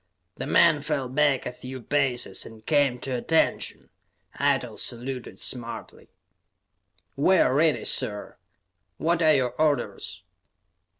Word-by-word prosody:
The -, -, -4 dB
men 155 Hz, -4 st, +4 dB
fell 145 Hz, -3 st, -2 dB
back 135 Hz, +1 st, +1 dB
a -, -, -3 dB
few 130 Hz, +1 st, -8 dB
paces 130 Hz, 0 st, 0 dB
and 110 Hz, -1 st, -13 dB
came 145 Hz, -5 st, +2 dB
to 135 Hz, -, -3 dB
attention; 160 Hz, +6 st, 0 dB, 0.5 s
Eitel -, -, 0 dB
saluted 125 Hz, +1 st, -4 dB
smartly. 120 Hz, -2 st, -3 dB, 1.1 s
"We 185 Hz, +7 st, +4 dB
are -, -, +3 dB
ready, 155 Hz, +2 st, +2 dB
sir. 105 Hz, -1 st, -1 dB, 0.6 s
What 170 Hz, +1 st, +1 dB
are 155 Hz, -2 st, +5 dB
your 130 Hz, -3 st, +1 dB
orders?" 150 Hz, -2 st, -1 dB
135 Hz, 120 wpm, -26 LUFS, 125-150 Hz, 1.1 s, are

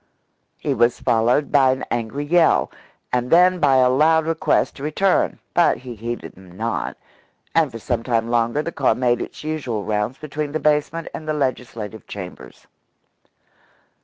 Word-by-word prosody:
He 145 Hz, -, -1 dB
was 120 Hz, -1 st, +2 dB
followed 120 Hz, +6 st, +2 dB
by 135 Hz, -3 st, +5 dB
an 130 Hz, 0 st, -1 dB
angry 120 Hz, +5 st, -2 dB
yell, 170 Hz, +2 st, +3 dB, 0.4 s
and 125 Hz, 0 st, 0 dB
then 180 Hz, +2 st, +5 dB
by 140 Hz, -4 st, +4 dB
a 130 Hz, -1 st, +5 dB
loud 160 Hz, +4 st, +3 dB
request 165 Hz, 0 st, 0 dB
to 140 Hz, -, -9 dB
return, 180 Hz, +6 st, +1 dB, 0.2 s
but 175 Hz, -, +3 dB
he 125 Hz, -1 st, -8 dB
heeded 120 Hz, +2 st, -6 dB
them 90 Hz, -1 st, -16 dB
not, 115 Hz, +1 st, -3 dB, 0.6 s
and 160 Hz, -4 st, +2 dB
for 115 Hz, -, -7 dB
some 115 Hz, +1 st, -2 dB
time 115 Hz, -1 st, 0 dB
longer 120 Hz, +5 st, +1 dB
the 170 Hz, -, -4 dB
car 135 Hz, -7 st, +1 dB
made 120 Hz, -1 st, +1 dB
its -, -, -7 dB
usual 140 Hz, -9 st, -3 dB
rounds 105 Hz, +5 st, -2 dB
between 150 Hz, -1 st, -5 dB
the 155 Hz, -, 0 dB
basement 150 Hz, +2 st, 0 dB
and 155 Hz, -, -7 dB
the 155 Hz, -, 0 dB
legislative 120 Hz, -6 st, -4 dB
chambers. 95 Hz, -3 st, -9 dB
130 Hz, 160 wpm, -21 LUFS, 115-155 Hz, 0.6 s, by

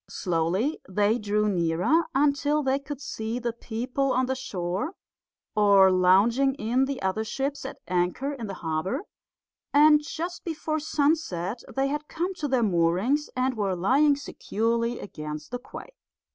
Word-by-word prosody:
Slowly 180 Hz, -, -1 dB
they 210 Hz, +4 st, +2 dB
drew 210 Hz, 0 st, 0 dB
nearer 180 Hz, -, +2 dB
until 290 Hz, +1 st, +2 dB
they 265 Hz, +1 st, +1 dB
could 280 Hz, 0 st, -7 dB
see 225 Hz, -4 st, -4 dB
the 240 Hz, -1 st, -2 dB
people 250 Hz, +4 st, -2 dB
on 255 Hz, +1 st, +2 dB
the 260 Hz, -, -1 dB
shore 190 Hz, -, -3 dB, 0.6 s
or 200 Hz, -2 st, +6 dB
lounging 205 Hz, +9 st, +4 dB
in 250 Hz, +2 st, +1 dB
the 275 Hz, 0 st, -4 dB
other 190 Hz, +3 st, 0 dB
ships 270 Hz, +6 st, -3 dB
at 270 Hz, -, -6 dB
anchor 180 Hz, +11 st, 0 dB
in 235 Hz, -6 st, -6 dB
the 195 Hz, -, -5 dB
harbour; 175 Hz, -, -1 dB, 0.7 s
and 300 Hz, +1 st, +6 dB
just 340 Hz, +4 st, -5 dB
before 315 Hz, -1 st, -2 dB
sunset 285 Hz, -, 0 dB
they 270 Hz, 0 st, +2 dB
had 295 Hz, +2 st, -3 dB
come 350 Hz, +4 st, -2 dB
to 325 Hz, -5 st, -3 dB
their 260 Hz, -3 st, +2 dB
moorings 190 Hz, -, +1 dB
and 255 Hz, 0 st, 0 dB
were 200 Hz, -4 st, 0 dB
lying 275 Hz, +11 st, +3 dB
securely 235 Hz, -3 st, -2 dB
against 150 Hz, -4 st, -7 dB
the 245 Hz, -, -3 dB
quay. -, -, -10 dB
245 Hz, 150 wpm, -26 LUFS, 195-285 Hz, 0.7 s, or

